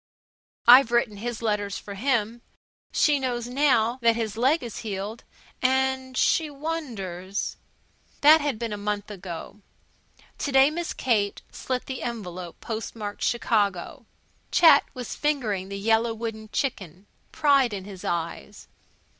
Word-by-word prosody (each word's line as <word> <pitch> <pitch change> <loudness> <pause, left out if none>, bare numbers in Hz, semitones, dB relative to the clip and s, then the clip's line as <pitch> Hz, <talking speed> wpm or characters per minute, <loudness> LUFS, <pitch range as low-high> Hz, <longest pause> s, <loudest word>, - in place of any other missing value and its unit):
I've 245 0 +8
written 235 -3 +1
his 235 +2 -5
letters 205 -2 -1
for 200 - -8
him. 235 0 -1 0.5
She 295 -2 +3
knows 245 -3 -2
now 250 -3 +2
that 230 -1 +4
his 225 -2 -3
leg 265 +8 +2
is 235 -3 -6
healed 210 +1 -5 0.4
and 260 0 +1
she 320 -2 +2
wonders 230 - -4 0.3
" - - -35
That 305 +2 +8
had 285 -5 -1
been 230 -1 -3
a - - -4
month 205 0 -3
ago. 185 +1 -8 0.8
To 285 - -2
day 270 +2 +6
Miss 340 +1 -3
Kate 210 -5 0
slit 255 -1 -3
the 260 -1 -5
envelope 185 -7 -6
postmarked 220 -2 -5
Chicago. 215 0 0 0.4
Chet 320 -4 +7
was 250 -2 -5
fingering 220 -11 -1
the 200 - -5
yellow 225 +2 +2
wooden 220 -1 -6
chicken, 195 - -3 0.3
pride 280 -6 +3
in 195 -2 -5
his 195 -3 -10
eyes. 165 - -4
230 Hz, 140 wpm, -25 LUFS, 205-265 Hz, 0.8 s, I've